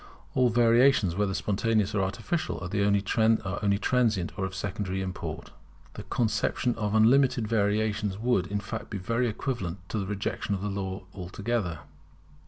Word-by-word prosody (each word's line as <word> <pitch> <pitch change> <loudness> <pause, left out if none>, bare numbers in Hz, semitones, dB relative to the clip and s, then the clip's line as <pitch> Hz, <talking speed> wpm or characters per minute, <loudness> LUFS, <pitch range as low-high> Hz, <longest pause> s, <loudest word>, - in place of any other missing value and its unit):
All 125 -1 +4
variations, 120 -3 +4
whether 100 -1 0
spontaneous 105 0 +1
or 100 - +1
artificial, 110 - -2
are 90 - -4
only 100 0 +2
transient 105 -1 +1
and - - -10
of 95 0 -5
secondary 95 0 -3
import. 95 -1 -5 0.4
The - - -7
conception 115 +2 0
of 105 -2 -2
unlimited 120 +1 +4
variations 105 -1 0
would 110 -5 +1
in 100 +1 -2
fact 115 +3 -6
be 105 - -4
equivalent 110 -4 -2
to 110 - -2
the 95 - -3
rejection 100 0 -2
of 95 - -5
Law 95 -2 -3
altogether. 95 -2 -3
105 Hz, 140 wpm, -28 LUFS, 95-115 Hz, 0.4 s, All